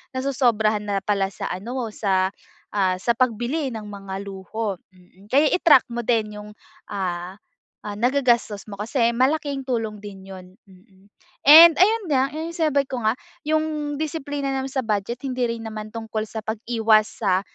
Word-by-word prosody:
nasosobrahan 235 -6 +1
na 200 -1 -1
pala 195 -1 -1
sa - - -5
ano, 230 +6 -4
sa, 190 -3 +1 0.5
ah, 190 -2 +2
sa 235 +4 +1
pagbili 255 +4 0
ng 215 -2 -7
mga 195 -1 -7
luho, 200 +2 -4 0.2
mm. 185 +2 -22
Kaya 290 +3 +5
i-track 310 -7 +5
mo 240 0 -3
din 215 -3 0
yung 210 - -11 0.4
ah, 185 -1 -4 0.5
ah, 205 - -5
nagagastos 240 -4 +1
mo 200 - -7
kasi 235 +2 +1
malaking 280 +2 0
tulong 220 -4 -2
din 195 -2 -10
yun, 185 -1 -10 0.2
mm. 190 +1 -22 0.4
And, 325 +2 +10
ayun 435 +4 +4
nga, 265 0 +2
yung 320 +2 -4
sinabi 305 -5 +1
ko 255 - -4
nga 220 +2 +2 0.3
yung 305 -2 -1
disiplina 290 -3 -3
naman 265 0 -2
sa 265 -2 -1
budget, 215 +4 -2
hindi 255 -1 -1
rin 230 -1 -4
naman 215 -1 -6
tungkol 220 -1 -4
sa 220 - -6
pag-iwas 220 -1 +2 0.2
sa, 185 -1 +3
225 Hz, 160 wpm, -23 LUFS, 205-270 Hz, 0.5 s, And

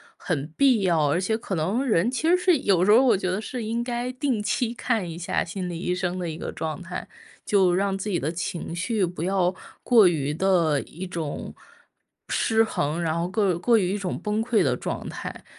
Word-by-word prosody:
很 150 -5 -3
必 260 -6 +4
要， 160 -5 +2
而 170 - +1
且 220 +4 0
可 200 -4 -4
能 195 - 0
人 220 -4 +2
其 320 +5 0
实 360 - +5
是 360 -3 +3
有 185 -5 +2
时 210 - +5
候 235 +5 +7
我 245 -7 +4
觉 185 -1 -2
得 190 - -2
是 240 +2 -5
应 230 +2 -2
该 245 +1 -3
定 255 -3 -1
期 240 +2 -1
看 220 -8 -1
一 165 - -7
下 175 - -1
心 180 +1 -5
理 175 - -4
医 180 0 -1
生 180 0 -2
的 175 -2 -3
一 155 - -6
个 - - -5
状 155 +1 -4
态。 180 +1 -6 0.4
就 190 -3 +4
让 195 +1 0
自 205 +2 -4
己 175 - 0
的 150 - -2
情 170 0 -4
绪 190 +2 0
不 170 -1 -5
要 185 -1 +1 0.3
过 230 -5 +6
于 150 -4 +1
的 165 -5 +2
一 180 +3 -8
种 165 -5 -5 0.7
失 225 0 +2
衡， 165 -7 0
然 165 -1 0
后 170 - 0
各 195 -4 +1
过 230 +6 +3
于 190 -2 +1
一 - - -1
种 190 -3 -3
崩 210 +1 -1
溃 230 -4 +2
的 130 -6 +2
状 - - -5
态。 - - -7
185 Hz, 240 characters per minute, -25 LUFS, 170-225 Hz, 0.7 s, 候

